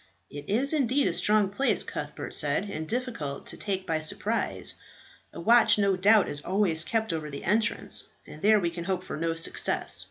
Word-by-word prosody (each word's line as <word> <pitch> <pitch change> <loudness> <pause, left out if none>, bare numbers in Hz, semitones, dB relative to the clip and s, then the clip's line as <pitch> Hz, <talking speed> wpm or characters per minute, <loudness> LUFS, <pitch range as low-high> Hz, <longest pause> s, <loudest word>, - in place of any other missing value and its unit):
"It 145 0 -9
is 260 +9 +2
indeed 275 -1 +1
a - - 0
strong 210 -2 +3
place," 270 +7 +1
Cuthbert - - -6
said, - - +1
"and 155 +1 -5
difficult 235 - -4
to - - -7
take 195 -2 -3
by 160 -3 -1
surprise. 155 - 0 0.6
A - - -10
watch 230 +5 +5
no 200 -2 +2
doubt 200 +2 +4
is 145 - -4
always 180 -4 +1
kept 220 0 -1
over 155 -2 -4
the 140 - -8
entrance, 210 +4 0 0.2
and 155 - -12
there 215 +1 +5
we 170 -3 -1
can 170 0 -7
hope 185 -1 -2
for - - -6
no 165 +1 -2
success. 165 - 0
195 Hz, 190 wpm, -27 LUFS, 165-220 Hz, 0.6 s, watch